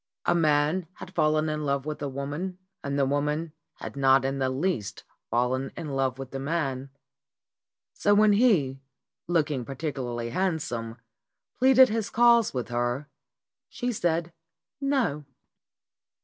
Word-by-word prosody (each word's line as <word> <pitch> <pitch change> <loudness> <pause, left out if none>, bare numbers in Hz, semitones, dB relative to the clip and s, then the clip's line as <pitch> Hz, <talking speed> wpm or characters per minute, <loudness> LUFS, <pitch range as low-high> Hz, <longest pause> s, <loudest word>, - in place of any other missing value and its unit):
A - - +3
man 155 +1 +2
had - - -11
fallen 155 0 +2
in 155 0 -2
love 140 -1 -1
with 155 -1 -5
a 145 - -2
woman 145 +7 -4 0.3
and 140 0 -2
the 140 - +3
woman 150 +3 -1 0.2
had - - -8
not 135 -1 +4
in 135 +1 -1
the 130 -1 +1
least 130 - -2 0.3
fallen 125 +3 0
in 155 - -5
love 135 -2 -1
with 135 -1 -8
the 135 - -4
man. 135 -3 -2 1.0
So 205 0 +2
when 210 0 +5
he, 175 - +3 0.5
look 160 -3 +1
ing 130 -4 -2
particularly 125 -4 -4
handsome, 120 -10 -2 0.6
pleaded 260 0 +7
his 220 -1 -2
cause 235 -1 +5
with 125 -3 -4
her, 120 +4 -2 0.6
she 245 0 -3
said 170 -5 -1 0.5
"No." 265 - 0
145 Hz, 140 wpm, -27 LUFS, 135-175 Hz, 1.0 s, pleaded